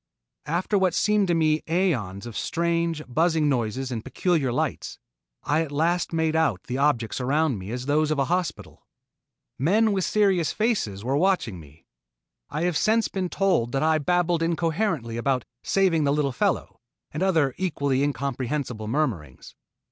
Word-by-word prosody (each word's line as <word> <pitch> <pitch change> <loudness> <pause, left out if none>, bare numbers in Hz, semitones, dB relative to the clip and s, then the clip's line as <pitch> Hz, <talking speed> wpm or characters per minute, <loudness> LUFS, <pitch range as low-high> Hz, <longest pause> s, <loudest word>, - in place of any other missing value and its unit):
After 180 +6 0
what 185 -2 +1
seemed 210 -2 +2
to 175 - +2
me 155 -1 +2
aeons 120 - 0
of 120 -3 -8
strange, 170 -1 -1
buzzing 160 +3 +2
noises 130 0 -1
and 115 -3 -4
peculiar 145 0 0
lights, 120 - -2 0.5
I 150 +2 +1
at 160 -3 -4
last 165 +4 0
made 160 -1 0
out 155 - +1
the 125 +2 -4
objects 135 -5 +1
around 140 -2 +1
me 95 +2 -8
as 125 +2 -4
those 150 +2 +2
of 155 - 0
a 140 - +2
hospital. 180 +1 -3 0.7
Men 210 - +3
with 195 -2 0
serious 190 -8 +2
faces 200 - -1
were 130 +3 0
watching 170 - +1
me. 75 0 -17 0.6
I 155 - -3
have 175 -2 +1
since 225 +1 +2
been 185 -2 -3
told 180 -13 +1
that 135 - +1
I 160 0 +3
babbled 175 +1 +1
incoherently 165 - -1
about 130 0 0 0.2
"saving 185 -5 +2
the 140 - +2
little 145 -2 +1
fellow" 125 - -1 0.3
and 155 - -5
other 160 -8 +2
equally 140 -7 0
incomprehensible 135 -4 -2
murmurings. 110 - -3
155 Hz, 160 wpm, -25 LUFS, 130-175 Hz, 0.7 s, Men